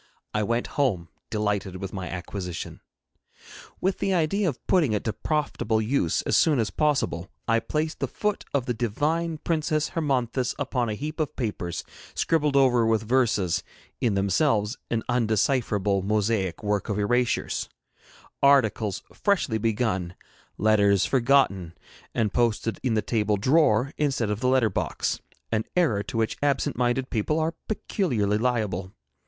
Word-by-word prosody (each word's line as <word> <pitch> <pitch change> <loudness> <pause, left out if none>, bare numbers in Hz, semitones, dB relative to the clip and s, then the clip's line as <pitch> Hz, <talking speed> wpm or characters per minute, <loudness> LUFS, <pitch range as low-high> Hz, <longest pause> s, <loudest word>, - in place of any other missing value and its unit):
I 105 - +1
went 115 +3 0 0.2
home, 90 - 0 0.2
delighted 105 -3 -1
with 95 +1 -6
my 95 -3 -4
acquisition. 90 0 -6 1.0
With 190 +1 0
the 195 -1 +1
idea 180 +3 +1
of 135 - -8
putting 155 -11 +3
it 105 - -1
to 110 - -1
profitable 140 -6 -1
use 110 - +1
as - - +1
soon 155 -3 +4
as 110 -3 0
possible, 140 - 0 0.2
I 115 0 +3
placed 155 +6 -2
the - - -1
foot 210 -1 -2
of 140 -3 0
the 125 - -1
divine 150 +9 -1
Princess 155 -1 0
Hermonthis 130 -5 -1
upon 125 -4 -1
a 105 - -2
heap 150 +7 -5
of 155 - -1
papers 95 -8 -3 0.3
scribbled 150 -3 +1
over 130 -4 +5
with 110 -1 +2
verses, 110 -8 +2 0.4
in 115 -5 +1
themselves 105 - +1
an 115 -1 -1
undecipherable 110 -4 +1
mosaic 105 -1 0
work 105 +1 -1
of 105 - -1
erasures; 120 +4 0 0.7
articles 115 -7 +3
freshly 180 - +1
begun; 105 -5 -1 0.4
letters 100 -3 +4
forgotten, 115 -7 +2 0.4
and 105 -3 0
posted 115 -1 0
in 125 -4 0
the 110 - +1
table 105 -3 +1
drawer 135 +2 +3
instead 135 -7 +1
of 105 - -2
the 125 +1 +1
letter 130 -5 +3
box, - - -2 0.3
an 110 -1 +1
error 155 - +2
to 120 +2 -5
which 110 -1 0
absent 145 0 +1
minded 125 +2 0
people 125 +8 0
are 160 +1 0
peculiarly 120 - 0
liable. 105 -6 -1
115 Hz, 150 wpm, -26 LUFS, 105-140 Hz, 1.0 s, over